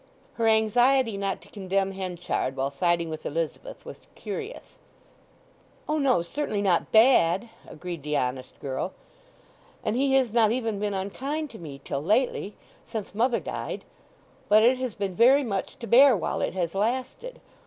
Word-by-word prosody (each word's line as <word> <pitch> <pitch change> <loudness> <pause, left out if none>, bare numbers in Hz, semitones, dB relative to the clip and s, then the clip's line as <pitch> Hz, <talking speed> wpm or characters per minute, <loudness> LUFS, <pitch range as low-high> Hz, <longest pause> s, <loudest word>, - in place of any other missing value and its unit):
Her 230 -1 0
anxiety 225 +2 +3
not 195 -1 -2
to - - -17
condemn 195 -1 -1
Henchard 180 -7 -3
while 135 +1 -1
siding 170 +3 0
with 155 - -6
Elizabeth 165 - -4
was - - -9 0.2
curious. 460 +1 -7 1.1
"O 305 0 0
no; 255 - +2
certainly 210 0 -3
not 180 -4 +1
bad," 220 -3 +4 0.2
agreed 170 0 -7
the 150 +1 -1
honest 130 0 -3
girl. 135 +7 -4 0.9
"And 215 - -1
he 270 +1 +2
has 255 -5 +2
not 225 -3 +4
even 225 -4 -1
been 205 -1 -2
unkind 275 +11 -3
to 220 - -11
me 140 -5 -9
till 140 - -3
lately—since 215 - -2
mother 235 +3 +1
died. - - -5 0.6
But 215 +1 +6
it 250 +2 +4
has 255 -4 -3
been 200 -2 -3
very 260 +9 +5
much 200 -6 -3
to 235 - -7
bear 255 +1 +6
while 175 - -2
it - - -2
has 170 -3 -1
lasted. 255 - -2
210 Hz, 155 wpm, -26 LUFS, 175-250 Hz, 1.1 s, But